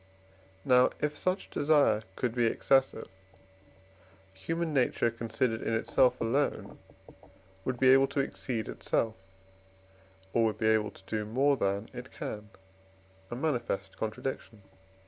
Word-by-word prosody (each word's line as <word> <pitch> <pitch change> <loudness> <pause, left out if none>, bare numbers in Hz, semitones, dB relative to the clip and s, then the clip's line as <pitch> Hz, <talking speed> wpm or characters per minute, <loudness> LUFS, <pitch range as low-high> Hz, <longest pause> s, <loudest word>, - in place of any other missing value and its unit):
Now, 125 0 +5
if 150 0 -1
such 185 +5 -2
desire 145 -8 +3
could 125 -3 -1
be 120 -1 +2
excessive, 135 +3 +1 1.3
human 165 - -3
nature 125 -3 +2
considered 115 0 -2
in 115 - -1
itself 125 +3 +2
alone 135 +6 -1 0.9
would 130 -2 -2
be 130 - +5
able 135 +1 +6
to 140 - -3
exceed 125 -4 -3
itself, 115 -1 -1 1.2
or 115 - +3
would 110 - 0
be 110 - +2
able 110 -1 +2
to - - -17
do 110 +1 -2
more 135 +7 +2
than 100 -2 -1
it 125 +1 -8
can, 105 0 -7 0.8
a - - -5
manifest 120 -9 -2
contradiction. 110 -1 -5
120 Hz, 125 wpm, -30 LUFS, 110-135 Hz, 1.3 s, able